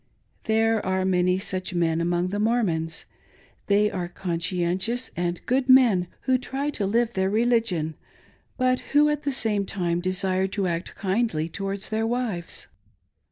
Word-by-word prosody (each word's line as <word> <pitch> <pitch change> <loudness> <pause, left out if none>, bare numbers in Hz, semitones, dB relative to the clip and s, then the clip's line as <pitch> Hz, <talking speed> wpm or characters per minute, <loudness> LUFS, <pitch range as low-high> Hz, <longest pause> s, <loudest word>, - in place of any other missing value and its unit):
There 225 0 +2
are 190 0 0
many 180 0 +2
such 185 -1 -3
men 165 -1 +1
among 175 +1 0
the 205 +2 -2
Mormons. 190 -8 0 0.6
They 210 +1 +3
are 175 -2 -3
conscien 175 0 -1
tious 240 +6 -1
and 175 0 -2
good 260 +1 +1
men, 235 -9 +6
who 260 -1 +2
try 275 +3 -3
to 205 -8 -1
live 235 +3 +1
their 190 0 +1
religion, 220 -8 +1 0.6
but 255 0 +2 0.2
who 300 0 +6
at 295 -1 -1
the 285 -1 -1
same 220 -6 +1
time 175 -3 -1
desire 185 +1 0
to 195 0 -2
act 170 0 -3
kindly 190 -5 0
towards 195 +3 -4
their 220 +1 0
wives. 225 -8 -3
195 Hz, 155 wpm, -25 LUFS, 175-230 Hz, 0.6 s, men